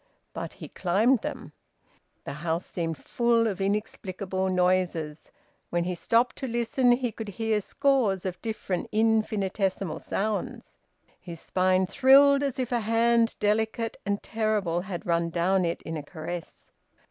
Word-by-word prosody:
But - - -5
he - - -9
climbed 215 +8 +2
them. - - -6 0.7
The - - -6
house 165 +1 -1
seemed 165 -3 -3
full 235 -1 +1
of 200 -3 -2
inexplicable 195 -2 -2
noises. 180 -4 0 0.4
When 175 0 0
he 180 +1 -2
stopped 230 +8 +1
to 265 - -4
listen 240 +1 +2
he 245 -1 -1
could 220 +1 -7
hear 215 +2 -1
scores 240 - +1
of 185 -1 -4
different 215 -5 -3
infinitesimal 210 -4 0
sounds. 210 +1 -3 0.4
His 170 -2 -9
spine 185 +1 +2
thrilled, 280 +5 +6
as 275 -3 -1
if 255 -2 -2
a 240 - +2
hand 230 +1 +2
delicate 220 +2 0
and 200 0 -2
terrible 210 -6 0
had 185 +1 -6
run 170 -1 +1
down 180 +2 +1
it 170 - -3
in 165 - -5
a - - -4
caress. 165 +3 -8
200 Hz, 145 wpm, -27 LUFS, 180-230 Hz, 0.7 s, thrilled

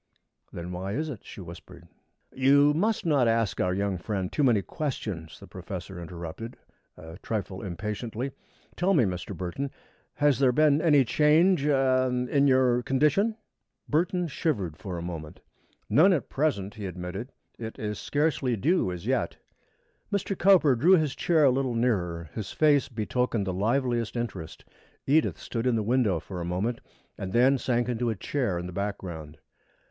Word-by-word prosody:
"Then 85 +1 -6
why 95 +2 -4
is 155 +6 -2
it?" 120 -9 -7
she - - -10
whispered. 85 0 -12 0.5
"You 140 +2 +5
must 200 +5 0
not 140 -7 +3
ask 115 -3 +1
our 90 - +1
young 100 -1 -1
friend 95 0 -3
too - - -1
many 115 -7 +3
questions," 105 - -5
the - - -11
professor 95 -2 -7
interrupted, 85 +7 -7 0.4
a 80 +3 -11
trifle 100 -4 -4
impatiently. 105 +7 -4 0.4
"Tell 190 +2 +2
me, 140 - +5
Mr. 90 -4 -3
Burton, 95 +10 -3 0.5
has 145 -3 +2
there 135 -2 +4
been 150 +2 +3
any 145 -5 +5
change 155 +6 +4
er 130 -2 +3 0.2
in 140 -1 +4
your 130 -2 +3
condition?" 150 - +2 0.5
Burton 175 +3 +1
shivered 110 - -2
for 95 -1 -6
a 85 - -5
moment. 80 -3 -7 0.5
"None 185 +6 +5
at 155 - -2
present," 120 -10 -1
he 105 -3 -6
admitted. 90 +7 -6 0.3
"It 110 -1 -6
is 105 -3 -4
scarcely 145 - 0
due 135 - +1
as 90 +1 -7
yet." 130 +3 -1 0.7
Mr. 200 -1 -1
Cowper 175 -8 +5
drew 160 +11 +5
his 155 -5 0
chair 165 -3 +2
a 135 - +6
little 130 -2 -1
nearer. 90 -9 0
His 110 - -5
face 145 -4 +3
betokened 115 -1 -1
the 95 - -2
liveliest 120 +3 0
interest. 100 -9 -5 0.4
Edith 150 +3 +2
stood 115 +1 -3
in 125 - +2
the 110 - 0
window 110 -6 +2
for 90 +2 -7
a - - -3
moment 95 +8 -2 0.4
and 95 -1 -5
then 130 +3 +4
sank 120 -1 0
into 120 -1 -1
a 110 - -1
chair 120 -3 -2
in 85 - -4
the 90 - -7
background. 85 -6 -5
120 Hz, 165 wpm, -27 LUFS, 95-140 Hz, 0.7 s, a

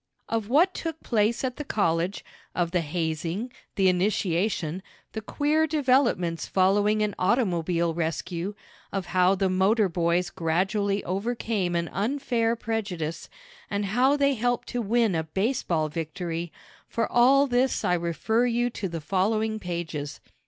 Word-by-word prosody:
Of 225 -2 -2
what 340 +9 +4
took 325 -1 -4
place 225 +1 +1
at 255 -1 -2
the 295 - -4
college, 180 - 0 0.3
of 175 -2 0
the 180 -1 +1
hazing, 165 +7 -3 0.2
the 190 -1 +3
initiation, 185 -2 0 0.3
the 220 - -4
queer 300 +7 +1
developments 255 - +1
following 205 +3 +3
an 210 -1 -1
automobile 175 -5 +1
rescue, 170 +4 -3 0.4
of 195 -2 -2
how 185 +1 +4
the 195 0 +1
motor 195 +3 +3
boys 175 +1 0
gradually 195 +4 0
overcame 200 -1 -1
an 170 0 0
unfair 230 +1 0
prejudice, 195 -9 -3 0.4
and 200 0 -1
how 260 +5 +4
they 280 -1 +3
helped 245 0 -1
to 245 - -2
win 225 -1 +2
a 160 -1 0
baseball 175 - 0
victory 165 +2 -4 0.4
for 230 - 0
all 270 +4 +5
this 255 0 +1
I - - +2
refer 180 +8 +1
you 240 +1 +1
to 195 -4 -4
the 165 -1 -5
following 215 +6 0
pages. 170 -6 -4
195 Hz, 140 wpm, -26 LUFS, 170-235 Hz, 0.4 s, all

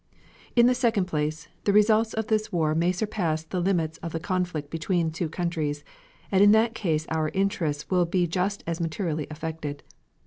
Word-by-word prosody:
In 235 -1 +6
the 250 - +5
second 235 -6 +1
place, 155 -2 -2 0.2
the 205 - +4
results 215 +2 +4
of 220 0 -1
this 215 0 0
war 160 -4 +1
may 170 +3 +2
surpass 180 -5 -1
the 180 +3 -4
limits 170 -4 0
of 165 -1 -6
the 165 - -1
conflict 175 -5 -2
between 165 0 0
two 165 0 -3
countries, 155 -4 -2 0.5
and 195 -1 +4
in 205 +1 +7
that 225 +1 +3
case 160 -8 -1
our 160 -1 0
interests 170 -7 0
will 180 -1 +4
be 175 +1 +1
just 185 +4 -1
as 170 +1 -3
materially 160 -2 -2
affected. 155 -2 -5
175 Hz, 180 wpm, -26 LUFS, 160-200 Hz, 0.5 s, in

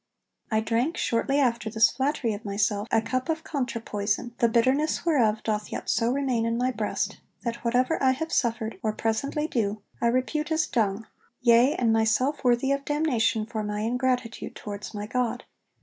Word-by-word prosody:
I 220 -1 +2
drank, 235 +8 0
shortly 275 +4 +1
after 235 -4 +1
this 220 0 +4
flattery 265 -4 0
of 205 +2 -7
myself, 205 +1 0
a 225 - +2
cup 255 +4 -2
of 320 0 -1
contra 255 -6 -2
poison, 210 +2 -2
the 235 - +4
bitterness 260 +9 +2
whereof 230 -10 +2
doth 210 -1 -2
yet - - -2
so 230 +1 +1
remain 260 -4 0
in 230 0 0
my 250 +1 +1
breast, 215 -3 -2 0.2
that 235 -1 -2
whatever 250 +6 +1
I 260 -1 +4
have 320 +5 -4
suffered, 230 -2 0
or 215 -1 0
presently 250 +8 -1
do, 215 -6 -1 0.2
I 235 - +3
repute 260 +6 0
as 315 0 +2
dung, 215 -2 0 0.3
yea, 240 +2 +5
and 230 -3 +2
myself 225 +7 +1
worthy 245 +2 +3
of 275 0 0
damnation 265 -8 +1
for 220 -1 -4
my 210 0 -3
ingratitude 245 0 -1
towards 205 +1 -7
my 205 0 -4
God. 245 +1 -1
235 Hz, 180 wpm, -26 LUFS, 220-260 Hz, 0.3 s, yea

